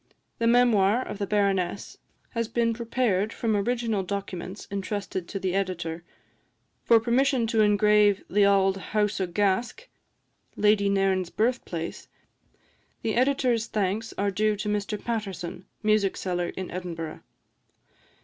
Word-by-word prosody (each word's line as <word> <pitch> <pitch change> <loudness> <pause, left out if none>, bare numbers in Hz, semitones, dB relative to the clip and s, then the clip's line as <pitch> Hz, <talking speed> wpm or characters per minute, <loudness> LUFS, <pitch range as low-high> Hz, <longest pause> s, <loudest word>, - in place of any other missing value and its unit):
The 230 - +2
memoir 235 -2 +4
of 205 - -6
the 200 - -2
Baroness 195 -2 0 0.3
has 230 -2 -2
been 230 0 +1
prepared 225 -3 0
from 225 -2 -1
original 225 0 0
documents 190 0 -5
entrusted 195 -2 -4
to 195 - -5
the 185 -1 -1
Editor. 175 -4 -2 0.8
For 230 - +6
permission 245 +1 +2
to 225 -1 +2
engrave 210 -1 +4
"The 205 +1 +3
Auld 195 -1 +4 0.2
House 210 -2 +1
o' 185 - 0
Gask," 205 - 0 0.7
Lady 210 -1 +3
Nairn's 195 -2 +1
birth 235 +5 0
place, 165 -1 -5 1.0
the 220 - 0
Editor's 250 -3 +2
thanks 210 +2 -1
are 200 +1 +1
due 215 +2 +1
to 210 - -5
Mr 210 0 -2
Paterson, 195 -6 -4 0.2
music 215 -2 +2
seller 175 -2 -2
in 185 +1 -6
Edinburgh. 170 -3 -5
205 Hz, 130 wpm, -26 LUFS, 190-225 Hz, 1.0 s, For